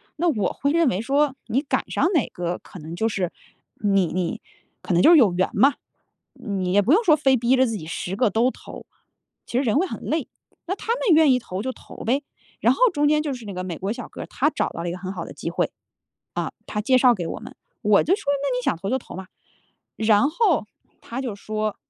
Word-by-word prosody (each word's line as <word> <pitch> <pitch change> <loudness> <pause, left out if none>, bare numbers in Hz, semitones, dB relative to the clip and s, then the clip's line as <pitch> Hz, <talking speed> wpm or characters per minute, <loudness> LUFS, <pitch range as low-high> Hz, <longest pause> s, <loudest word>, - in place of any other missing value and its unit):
那 345 +3 0
我 215 -9 0
会 280 +1 0
认 335 -2 +3
为 190 - +1
说， 275 +2 +1
你 260 - +1
赶 285 - -2
上 - - +1
哪 310 -8 +3
个 175 0 -3
可 185 - -12
能 160 +2 -7
就 220 +5 0
是 190 -5 -2 0.5
你 195 -3 +3
你 180 0 -2 0.4
可 - - -2
能 175 - +4
就 330 - +8
是 340 - +8
有 225 -9 +5
缘 185 +1 +1
嘛。 275 +2 +4 0.6
你 190 -4 -3
也 205 - +5
不 230 +8 +1
用 445 +7 +4
说 320 -7 +6
非 270 -3 +3
逼 240 +2 +3
着 260 -1 +3
自 225 - -3
己 155 - -8
10 175 +3 -4
个 225 0 +2
都 235 +3 +3
投， - - -11 0.6
其 240 - -1
实 275 - +1
人 225 -1 +1
会 365 - +3
很 - - -7
累， 310 -3 -2 0.4
那 370 - -2
他 - - -12
们 - - -7
愿 310 -3 +6
意 255 - +4
投 190 -6 -5
就 260 +4 -2
投 - - -14
呗。 270 +5 +1 0.4
然 - - +4
后 - - -9
中 295 -2 +1
间 300 0 +3
就 300 -1 -3
是 235 -3 -10
那 200 - -6
个 185 0 -4
美 175 -3 -5
国 195 +3 -2
小 245 0 -7
哥 - - -9
儿， - - -5
他 290 - +1
找 - - -1
到 - - -7
了 175 - -3
一 - - -3
个 180 - -5
很 185 +1 -6
好 170 -3 -5
的 - - -9
机 - - -5
会， - - -1 0.6
啊， - - -2
他 210 - -3
介 255 +5 +3
绍 250 -1 +6
给 175 -6 -4
我 - - -5
们， - - -11 0.3
我 210 -1 +4
就 355 - +3
说： - - -6 0.2
“那 270 -3 0
你 250 - -2
想 175 - 0
投 195 - -5
就 260 - +1
投 235 - -11
嘛。” 190 -1 -7 0.7
然 220 +5 +3
后 340 - +2 0.3
他 245 +3 -6
就 245 -6 -4
说， 215 +1 -3
235 Hz, 270 characters per minute, -23 LUFS, 195-280 Hz, 0.7 s, 就